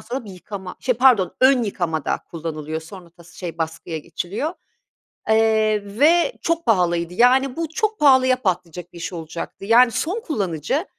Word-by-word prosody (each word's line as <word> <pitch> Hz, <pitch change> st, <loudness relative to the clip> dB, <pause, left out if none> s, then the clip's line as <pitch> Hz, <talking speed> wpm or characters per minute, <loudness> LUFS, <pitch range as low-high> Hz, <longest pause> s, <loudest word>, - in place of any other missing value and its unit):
sonra 245 Hz, 0 st, -5 dB
bir 205 Hz, -, -10 dB
yıkama, 190 Hz, 0 st, -8 dB
şey, 250 Hz, -, +1 dB
pardon 240 Hz, -6 st, +4 dB
ön 260 Hz, -1 st, +5 dB
yıkamada 175 Hz, -7 st, -2 dB
kullanılıyor 160 Hz, -1 st, -5 dB
sonra 170 Hz, +1 st, -12 dB
tas 170 Hz, 0 st, -18 dB
şey, 170 Hz, -3 st, -7 dB
baskıya 160 Hz, 0 st, -4 dB
geçiliyor, 205 Hz, -, -4 dB, 0.8 s
eee, 220 Hz, -1 st, +3 dB, 0.2 s
ve 340 Hz, +9 st, +4 dB
çok 335 Hz, 0 st, -1 dB
pahalıydı. 175 Hz, -5 st, +1 dB
Yani, 250 Hz, +5 st, +3 dB
bu 330 Hz, -1 st, -3 dB
çok 430 Hz, +6 st, -2 dB
pahalıya 260 Hz, -3 st, +5 dB
patlayacak 180 Hz, -3 st, -3 dB
bir -, -, -11 dB
iş 170 Hz, -, -5 dB
olacaktı. 165 Hz, +3 st, -7 dB
Yani, 235 Hz, +3 st, +5 dB
son 335 Hz, -, -2 dB
kullanıcı 200 Hz, -, -2 dB
205 Hz, 155 wpm, -21 LUFS, 170-260 Hz, 0.8 s, ön